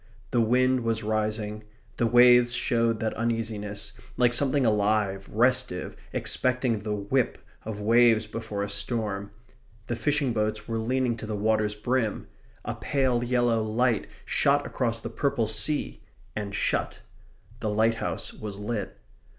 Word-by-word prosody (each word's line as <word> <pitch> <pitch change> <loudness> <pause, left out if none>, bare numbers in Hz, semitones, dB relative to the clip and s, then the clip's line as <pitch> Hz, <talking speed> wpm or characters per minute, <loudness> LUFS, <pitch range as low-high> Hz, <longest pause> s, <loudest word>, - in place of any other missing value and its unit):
The 120 - +3
wind 130 +3 +3
was 115 -2 -1
rising. 110 0 -2 0.3
The 120 - +2
waves 120 +1 +6
showed 115 -2 +1
that 110 - -1
uneasiness, 105 -3 -3 0.2
like 120 -1 +3
something 135 +1 +2
alive, 105 -2 +1
restive, 125 +3 +1 0.2
expecting 125 -3 0
the 105 0 -3
whip, 110 +5 0 0.3
of 110 -1 -5
waves 115 +1 +4
before 105 -2 -4
a - - -2
storm. 105 -5 -2 0.6
The 120 - -2
fishing 140 +1 +1
boats 110 -1 -2
were 115 -1 -2
leaning 125 +1 0
to 110 - -7
the 110 - -3
water's 105 0 +1
brim. 115 0 -1 0.4
A - - -2
pale 130 -4 0
yellow 120 -2 +2
light 115 +1 +1 0.2
shot 145 +1 +2
across 115 -3 -1
the 120 - -5
purple 120 -2 0
sea; 110 - 0 0.3
and 100 -1 -4
shut. - - -1 0.6
The 110 - -2
lighthouse 110 +2 0
was 105 -2 -7
lit. 105 +1 -4
115 Hz, 140 wpm, -27 LUFS, 105-120 Hz, 0.6 s, waves